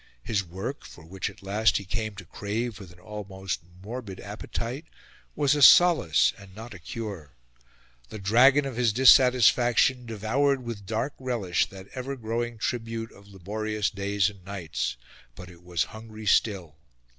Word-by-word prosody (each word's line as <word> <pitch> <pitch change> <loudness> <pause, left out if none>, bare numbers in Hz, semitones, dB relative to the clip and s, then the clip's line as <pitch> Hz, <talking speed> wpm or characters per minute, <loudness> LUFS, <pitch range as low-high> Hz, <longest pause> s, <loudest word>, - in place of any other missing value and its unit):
His 100 -3 0
work, 95 +10 -6
for 80 - -13
which 95 +3 -4
at - - -16
last 105 +3 +2
he 100 - -6
came 110 +2 -4
to 95 -3 -10
crave 110 +5 -4
with 95 -3 -11
an 90 - -17
almost 95 -1 -6 0.2
morbid 110 -3 -7
appetite, 115 +7 -6 0.5
was 145 -1 +3
a 150 - 0
solace 85 - +6
and 95 -1 -14
not 115 +1 -9
a 95 - -10
cure; 95 - -7 0.7
the - - -7
dragon 125 +8 +5
of 130 -4 -5
his 120 -3 +3
dissatisfaction 125 0 +5
devoured 125 +5 0
with 110 -5 -7
dark 115 +7 -2
relish 120 -9 0
that 95 0 -11
ever 130 +1 -4
growing 120 0 -3
tribute 115 -1 -3
of 100 0 -17
laborious 105 +2 -3
days 100 -1 0
and 100 -3 -8
nights; 85 -10 -4 0.4
but 90 0 -10
it 85 -1 -17
was 85 -2 0
hungry 110 -1 -10
still. 95 -7 +1
110 Hz, 155 wpm, -27 LUFS, 95-120 Hz, 0.7 s, solace